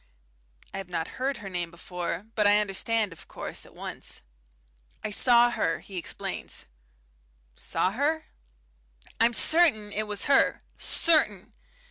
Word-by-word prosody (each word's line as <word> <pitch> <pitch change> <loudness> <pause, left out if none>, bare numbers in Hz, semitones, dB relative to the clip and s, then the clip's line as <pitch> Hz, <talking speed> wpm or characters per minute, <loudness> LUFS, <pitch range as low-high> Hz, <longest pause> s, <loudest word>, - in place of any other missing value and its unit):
I 195 - -4
have 190 -2 -8
not 165 -2 -2
heard 270 0 -1
her 205 - -9
name 175 -2 -3
before, 180 +2 -5
but 210 -2 +3
I 205 0 +6
understand, 210 0 0
of 165 - -15
course, - - -6
at - - -19
once. - - -5 0.8
"I 215 - -3
saw 240 +2 +5
her," - - 0
he 195 - -12
explains. 175 - -4 0.9
"Saw 185 - -1
her?" 300 +8 0 0.9
"I'm 235 +1 +4
certain 235 -8 +4
it 215 +1 -2
was 210 -1 -2
her. 275 - +3 0.2
Certain. 215 - +2
210 Hz, 135 wpm, -27 LUFS, 190-240 Hz, 0.9 s, I